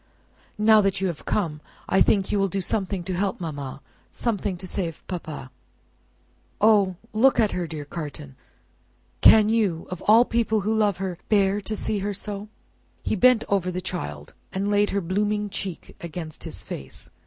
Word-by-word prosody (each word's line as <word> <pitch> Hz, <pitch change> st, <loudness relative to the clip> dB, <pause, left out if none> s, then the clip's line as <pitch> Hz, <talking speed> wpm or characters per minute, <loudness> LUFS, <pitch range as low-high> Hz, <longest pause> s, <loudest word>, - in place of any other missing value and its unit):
"Now 215 Hz, 0 st, +6 dB
that 195 Hz, -1 st, 0 dB
you 195 Hz, -, -1 dB
have 170 Hz, -, -7 dB
come, 160 Hz, -8 st, -1 dB, 0.3 s
I 190 Hz, -, +3 dB
think 195 Hz, -2 st, +3 dB
you 205 Hz, -, +1 dB
will 195 Hz, -, +3 dB
do 195 Hz, +1 st, -2 dB
something 190 Hz, -1 st, -1 dB
to 185 Hz, +2 st, -3 dB
help 195 Hz, +2 st, -1 dB
mamma, 145 Hz, -5 st, -6 dB, 0.3 s
something 205 Hz, -5 st, -1 dB
to 185 Hz, -, -7 dB
save 170 Hz, -4 st, -3 dB
papa! 155 Hz, -7 st, -6 dB, 1.1 s
O, 205 Hz, -3 st, +4 dB, 0.2 s
look 255 Hz, +5 st, +4 dB
at 215 Hz, -3 st, +3 dB
her, 180 Hz, -2 st, -2 dB
dear 155 Hz, -2 st, -6 dB
Carton! 145 Hz, -, -7 dB, 0.9 s
Can 215 Hz, -1 st, +8 dB
you, 210 Hz, -7 st, +1 dB
of 180 Hz, -, -5 dB
all 225 Hz, +3 st, +8 dB
the -, -, -15 dB
people 225 Hz, -2 st, +1 dB
who 215 Hz, +3 st, 0 dB
love 210 Hz, -3 st, +2 dB
her, 185 Hz, -2 st, -4 dB
bear 200 Hz, -1 st, +3 dB
to 215 Hz, +2 st, -3 dB
see 210 Hz, 0 st, -1 dB
her 200 Hz, +1 st, -2 dB
so?" 205 Hz, +1 st, -5 dB, 0.5 s
He -, -, 0 dB
bent 245 Hz, +2 st, +5 dB
over 195 Hz, -2 st, +1 dB
the 180 Hz, 0 st, -3 dB
child, 75 Hz, -, -5 dB, 0.2 s
and 200 Hz, +2 st, -1 dB
laid 205 Hz, 0 st, +3 dB
her 200 Hz, -, 0 dB
blooming 205 Hz, +3 st, -1 dB
cheek 190 Hz, -3 st, -6 dB
against 165 Hz, -2 st, -6 dB
his -, -, -5 dB
face. 65 Hz, -1 st, -8 dB
195 Hz, 175 wpm, -25 LUFS, 175-210 Hz, 1.1 s, Can